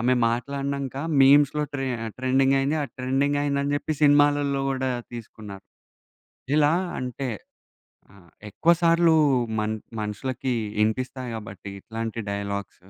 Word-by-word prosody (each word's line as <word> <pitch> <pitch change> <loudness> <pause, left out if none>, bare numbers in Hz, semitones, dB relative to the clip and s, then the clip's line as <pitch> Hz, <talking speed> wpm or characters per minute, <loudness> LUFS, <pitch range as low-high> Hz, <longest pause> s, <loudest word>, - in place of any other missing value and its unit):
ఆమె 125 +2 +3
మాట్లాడినంక 140 +2 -3 0.3
మీమ్స్‌లో 145 +2 +5
tray 135 -1 -2 0.3
trending 135 +1 +2
అయింది 140 +3 0
ఆ - - -1
ట్రెండింగ్ 135 +3 0
అయింది 140 -1 0
అని 145 +1 0
చెప్పి 155 - -3
సినిమాలలో 145 -1 +4
కూడా 130 -1 -1 0.2
తీసుకున్నారు. 105 -4 -10 0.9
ఇలా 150 +1 +4 0.3
అంటే 125 +1 -4 0.9
ఆహ్, 85 -5 -19 0.2
ఎక్కువ 170 - +3
సార్లు 165 -1 +5 0.5
మన్ 110 +1 -1 0.3
మనుషులకి 125 +4 -3 0.3
ఇనిపిస్తాయి 125 +3 -2
కాబట్టి 100 -2 -9
ఇట్లాంటి 115 0 -5
డైలాగ్సు 100 -2 -5
130 Hz, 115 wpm, -25 LUFS, 115-140 Hz, 0.9 s, మీమ్స్‌లో